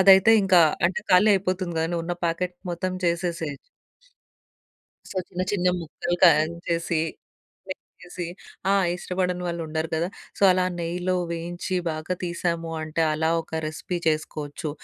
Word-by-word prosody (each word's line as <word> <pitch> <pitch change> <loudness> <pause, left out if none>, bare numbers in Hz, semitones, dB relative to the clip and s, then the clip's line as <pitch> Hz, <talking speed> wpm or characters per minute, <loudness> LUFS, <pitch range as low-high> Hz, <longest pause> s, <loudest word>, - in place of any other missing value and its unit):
అదైతే 190 +2 +8
ఇంక 190 -1 +3 0.3
అంటే, 185 - -2
ఖాళీ 185 +4 +6
అయిపోతుందిగా! 185 -3 -1
ను - - 0
ఉన్న 175 - -2
ప్యాకెట్ 180 +2 -1 0.2
మొత్తం 180 +2 -2
చేసేసేయోచ్చు. 170 -3 -1 1.5
సొ, - - -9
చిన్న 180 -1 -3
చిన్న 180 -3 +2
ముక్కలు 175 +2 -3
కాన్ 160 -2 +6
చేసి 170 -1 0 0.7
లె 185 - -2 0.3
చేసి 175 -1 -6 0.4
ఆ! - - +5 0.2
ఇష్టపడని 180 0 -2
వాళ్ళుండరు 160 -2 -2
కదా! 170 +3 0 0.3
సో, - - -5
అలా 185 0 +2
నెయ్యిలో 175 +2 -1 0.2
వేయించి 175 +2 -3
బాగా 155 +3 -3
తీసాము 170 -1 -2
అంటే, 155 +1 -1
అలా 160 +1 +1
ఒక 160 0 -4
రెసిపీ 155 +3 -4
చేసుకోవచ్చు. 155 0 -2
175 Hz, 135 wpm, -25 LUFS, 160-180 Hz, 1.5 s, అదైతే